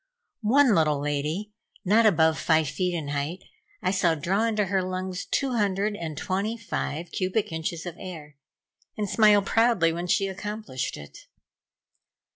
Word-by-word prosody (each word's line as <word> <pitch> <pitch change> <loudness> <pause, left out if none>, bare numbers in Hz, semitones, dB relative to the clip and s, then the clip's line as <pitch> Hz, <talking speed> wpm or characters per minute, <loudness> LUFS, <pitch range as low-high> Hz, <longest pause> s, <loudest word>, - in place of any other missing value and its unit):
One 270 -1 +5
little 155 -5 +2
lady, 150 +8 -2 0.3
not 220 +4 +5
above 160 -5 +3
five 160 -2 +2
feet 180 +4 -1
in 155 -4 -4
height, 145 +6 -3 0.4
I - - +2
saw 180 -4 +2
draw 190 +8 0
into 215 -2 +1
her 190 0 0
lungs 185 0 -4
two 275 -2 -1
hundred 205 -2 0
and 160 -5 -6
twenty 200 +7 -2
five 175 -6 -4
cubic 190 +2 -1
inches 160 +1 -4
of 175 -1 -6
air, 155 -6 -9 0.6
and 210 -1 -1
smile 210 0 +5
proudly 225 -7 +3
when 175 +2 -4
she 195 +3 +2
accomplished 200 - -4
it. 75 -1 -12
185 Hz, 150 wpm, -26 LUFS, 160-210 Hz, 0.6 s, One